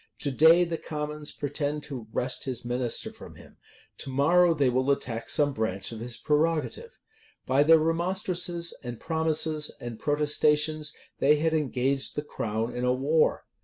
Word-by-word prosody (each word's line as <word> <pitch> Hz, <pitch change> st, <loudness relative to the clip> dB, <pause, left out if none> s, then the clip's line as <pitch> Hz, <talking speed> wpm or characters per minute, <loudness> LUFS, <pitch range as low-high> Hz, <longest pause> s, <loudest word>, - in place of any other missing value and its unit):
To 145 Hz, -, -1 dB
day 160 Hz, +6 st, +6 dB
the 170 Hz, -1 st, -3 dB
commons 150 Hz, -1 st, -4 dB
pretend 145 Hz, +1 st, -3 dB
to 125 Hz, -7 st, -7 dB
wrest 125 Hz, +4 st, -1 dB
his 125 Hz, -2 st, -5 dB
minister 120 Hz, 0 st, -2 dB
from -, -, -12 dB
him: -, -, -16 dB, 0.4 s
to -, -, -5 dB
morrow 165 Hz, +6 st, +4 dB
they 140 Hz, -3 st, +2 dB
will 130 Hz, +2 st, +1 dB
attack 115 Hz, -4 st, -1 dB
some 145 Hz, -2 st, +2 dB
branch 110 Hz, -4 st, -2 dB
of 115 Hz, -, -7 dB
his 120 Hz, 0 st, -5 dB
prerogative. 165 Hz, -, -1 dB, 0.5 s
By 130 Hz, +2 st, +3 dB
their 160 Hz, +2 st, +7 dB
remonstrances, 170 Hz, +1 st, 0 dB
and 120 Hz, -2 st, -6 dB
promises, 160 Hz, -1 st, +1 dB
and 120 Hz, -2 st, -7 dB
protestations, 150 Hz, +1 st, +1 dB, 0.3 s
they 145 Hz, +2 st, +5 dB
had 160 Hz, +2 st, 0 dB
engaged 135 Hz, -2 st, -1 dB
the 150 Hz, -, -2 dB
crown 115 Hz, -4 st, -3 dB
in 125 Hz, -, -3 dB
a 125 Hz, -, +2 dB
war. 145 Hz, +5 st, +1 dB
150 Hz, 160 wpm, -27 LUFS, 130-160 Hz, 0.5 s, their